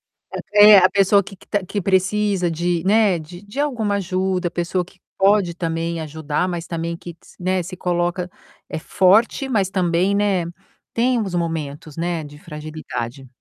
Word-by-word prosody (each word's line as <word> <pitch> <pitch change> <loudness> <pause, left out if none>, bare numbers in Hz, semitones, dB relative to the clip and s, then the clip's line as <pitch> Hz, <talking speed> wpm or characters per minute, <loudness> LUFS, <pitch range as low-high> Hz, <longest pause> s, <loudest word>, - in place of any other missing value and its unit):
a - - -9 0.2
é, 205 0 +10
a 185 0 +5
pessoa 200 +1 +4
que 195 - -11
que - - -20 0.2
que 205 +2 -3
precisa 190 0 +1
de, 170 +1 -1
né, 205 -4 +3
de 175 +4 -11
de 205 +7 -8
alguma 230 -8 0
ajuda, 185 -1 -1
a - - -28
pessoa 175 +1 -1
que 185 - -22 0.2
pode 195 -3 +3
também 165 0 -2
ajudar, 155 +2 -2
mas 175 -2 -4
também 170 0 -3
que 170 -1 -10
s - - -19
né, 185 0 0
se 185 +2 -7
coloca 175 0 -1 0.4
é - - -4
forte, 210 - +3
mas 200 -6 +1
também, 185 +1 +1
né, 200 -4 +1 0.5
tem 245 +1 +2
uns 190 -4 -3
momentos, 155 -3 -4
né, 170 -1 -2
de 145 0 -11
fragilidade. 150 -5 -7
180 Hz, 170 wpm, -21 LUFS, 165-200 Hz, 0.5 s, é